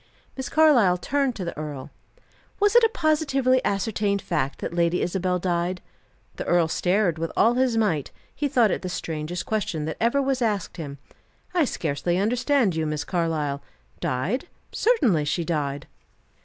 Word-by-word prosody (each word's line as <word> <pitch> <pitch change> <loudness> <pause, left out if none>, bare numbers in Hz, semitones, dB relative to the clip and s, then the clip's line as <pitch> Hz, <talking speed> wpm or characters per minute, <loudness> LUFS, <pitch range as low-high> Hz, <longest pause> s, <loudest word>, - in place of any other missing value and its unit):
Miss 265 -1 -5
Carlyle 260 - +5
turned 275 +5 0
to 185 - -5
the 170 - -5
earl. 150 -3 -6 0.7
"Was 415 +2 +3
it 480 - +7
a 455 - +5
positively 275 - +1
ascertained 200 0 0
fact 150 -7 -2
that - - -5
Lady 170 0 +1
Isabel 180 0 0
died?" 180 0 -1 0.6
The - - -4
earl 175 -2 +3
stared 180 0 +1
with 165 0 -2
all 230 - +5
his 250 -2 +1
might; 170 -11 +1 0.2
he 290 - -1
thought 245 -6 +3
it - - -1
the 185 - -4
strangest 165 0 -4
question 185 -8 -2
that 160 - -4
ever 235 +5 +2
was 270 -2 0
asked 210 -5 -1
him. 145 -4 -6 0.6
"I 345 -4 +3
scarcely 175 - -1
understand 245 - +2
you, 160 -1 -1
Miss 150 -1 -2
Carlyle. 155 -5 -1 0.4
Died? 170 - -2 0.2
Certainly 255 - +2
she 165 +3 -1
died." 145 -4 -2
185 Hz, 160 wpm, -24 LUFS, 160-255 Hz, 0.7 s, it